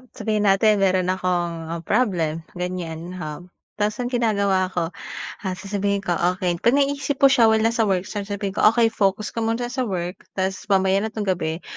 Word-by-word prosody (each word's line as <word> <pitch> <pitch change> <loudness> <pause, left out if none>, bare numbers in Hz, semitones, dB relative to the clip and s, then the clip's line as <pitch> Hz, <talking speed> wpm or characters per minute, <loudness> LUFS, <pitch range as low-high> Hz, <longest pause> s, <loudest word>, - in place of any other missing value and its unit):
sabihin 215 -1 -1
natin 205 +2 +4
meron 185 -1 +2
akong 170 -3 -2
problem, 170 -9 +1
ganyan. 180 -1 -5
Um, 165 0 -7 0.3
tas 210 0 +1
ang 245 0 -2
ginagawa 200 -6 +2
ko 170 -1 -1 0.6
ah, 185 - -2
sasabihin 200 +1 -2
ko, 180 - -2 0.2
okey 175 -2 -1
pag 235 +7 +3
naiisip 280 0 +1
po 275 - +8
siya 235 -4 +5
while 220 0 +3
nasa 230 0 +2
work, 185 -2 +1
sasabihin 205 -1 -4
ko, - - -3
okey 225 -1 +3
focus 210 -1 0
ka - - -4
muna 230 +2 -1
sa 255 -2 -1
work 180 -1 -4
tas 190 +1 -2
mamaya 190 0 +3
na 220 - -3
tong 215 -1 -3
gabi, 165 -2 -1
195 Hz, 180 wpm, -23 LUFS, 180-220 Hz, 0.6 s, po